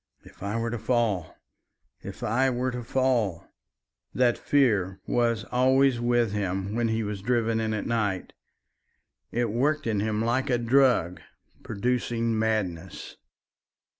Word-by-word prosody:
"If - - -18
I 100 +3 -2
were 115 0 -2
to 120 - -3
fall! 110 -9 0 0.7
If - - -9
I 130 +5 +2
were 130 +1 -1
to 125 0 -5
fall!" 120 -8 0 0.7
That 125 -2 +3
fear 105 -10 +1
was 115 -3 +1
always 130 0 +3
with 120 -2 +1
him 95 -1 -2
when 120 0 0
he 110 0 0
was 105 -2 -4
driven 115 0 +1
in 110 -1 -1
at 105 - -3
night. 105 -5 -1 1.0
It 120 -2 0
worked 145 +6 0
in 110 -3 0
him 105 +1 -1
like 125 +3 0
a 125 - +3
drug 120 -8 +2 0.4
producing 115 0 -1
madness. 95 -6 -2
115 Hz, 135 wpm, -26 LUFS, 105-125 Hz, 1.0 s, That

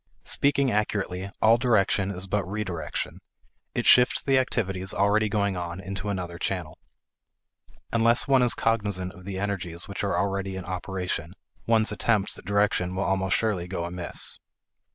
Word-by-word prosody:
Speaking 140 -2 +2
accurately, 100 -3 -1
all 115 +2 +6
direction 105 -5 +2
is 90 -1 -4
but 100 +1 0
re 105 +3 -3
direction; 85 -6 -4 0.5
it - - -1
shifts 125 0 +6
the 135 -1 +3
activities 95 -7 -2
already 105 +2 +3
going 100 -2 0
on 85 0 -4
into 95 +2 -5
another 90 -3 -4
channel. - - -3 1.1
Unless 115 +1 +4
one 135 -2 +5
is 125 -1 +4
cognizant 100 -5 0
of 90 +1 -14
the 95 -1 -5
energies 95 -4 -2
which 100 +1 -5
are 100 - 0
already 100 -1 -1
in 95 -1 -6
operation, 90 -2 -4 0.3
one's 110 -1 +3
attempts 105 -1 +1
at - - -15
direction 100 -2 +1
will 95 - 0
almost 95 -1 +1
surely 100 -6 -1
go 90 -2 -3
amiss. 85 0 -3
100 Hz, 155 wpm, -26 LUFS, 90-110 Hz, 1.1 s, all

